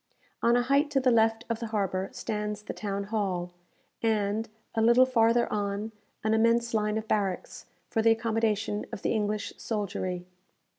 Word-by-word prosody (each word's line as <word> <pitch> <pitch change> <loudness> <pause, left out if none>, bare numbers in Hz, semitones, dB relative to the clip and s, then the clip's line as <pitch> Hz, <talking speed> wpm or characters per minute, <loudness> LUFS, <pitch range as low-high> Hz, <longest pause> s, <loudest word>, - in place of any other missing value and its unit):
On 235 +1 +4
a 245 - +3
height 280 +4 +2
to 280 - +2
the 255 -1 +3
left 225 0 +3
of 230 -1 -2
the 230 - -4
harbour 195 -3 -1
stands 210 -1 -4
the - - -5
town 200 -1 -3
hall, 195 -4 -2 0.5
and, 215 0 0 0.2
a 225 - +1
little 235 +3 +6
farther 235 -1 +3
on, 205 +1 -2 0.3
an 220 0 +2
immense 230 +1 +3
line 210 -1 +1
of 220 0 -4
barracks, 195 -4 -2 0.2
for 225 - 0
the 225 - +5
accommodation 220 -2 0
of - - -7
the - - +1
English 210 -1 -1
soldiery. 185 -4 -3
220 Hz, 165 wpm, -28 LUFS, 205-230 Hz, 0.5 s, little